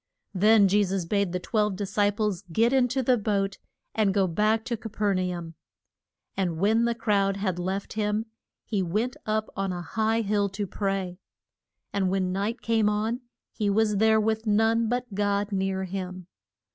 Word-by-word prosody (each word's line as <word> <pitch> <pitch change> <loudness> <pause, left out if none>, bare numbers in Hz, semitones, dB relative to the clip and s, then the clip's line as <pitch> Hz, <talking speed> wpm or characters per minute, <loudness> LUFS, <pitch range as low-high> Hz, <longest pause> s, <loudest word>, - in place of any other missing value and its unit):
Then 210 +1 +5
Je 205 +2 +3
sus 190 -2 -2
bade 200 0 0
the 180 - -2
twelve 210 +1 0
dis 200 +1 -5
ci 205 -1 +3
ples 205 -3 -1
get 230 +8 +3
in 260 -2 +4
to 260 +2 -1
the 250 -1 +3
boat 200 -2 -1 0.3
and 210 -3 +1
go 195 -2 +4
back 215 +5 +1
to 235 - -1
Ca 225 0 -8
per 205 -1 0
na 180 -1 -1
um. 165 -1 -8 0.8
And 175 -4 -1
when 220 +6 +3
the 235 0 0
crowd 200 -3 +1
had 190 -3 -2
left 190 +2 -3
him 210 0 -1 0.4
he 205 -4 -1
went 210 +8 -1
up 215 0 -1
on 195 -1 -1
a 175 -1 -4
high 220 +5 0
hill 205 -1 +1
to 200 +2 -3
pray. 195 -2 -3 0.7
And 195 -2 +1
when 185 -1 0
night 205 +5 -2
came 225 -2 +2
on 220 +4 -1 0.3
he 210 -3 -1
was 210 0 +2
there 220 +1 +4
with 220 +1 0
none 225 +2 +3
but 245 -2 -2
God 205 +1 0
near 190 -1 -1
him. 185 -1 -5
205 Hz, 185 wpm, -26 LUFS, 190-220 Hz, 0.8 s, Then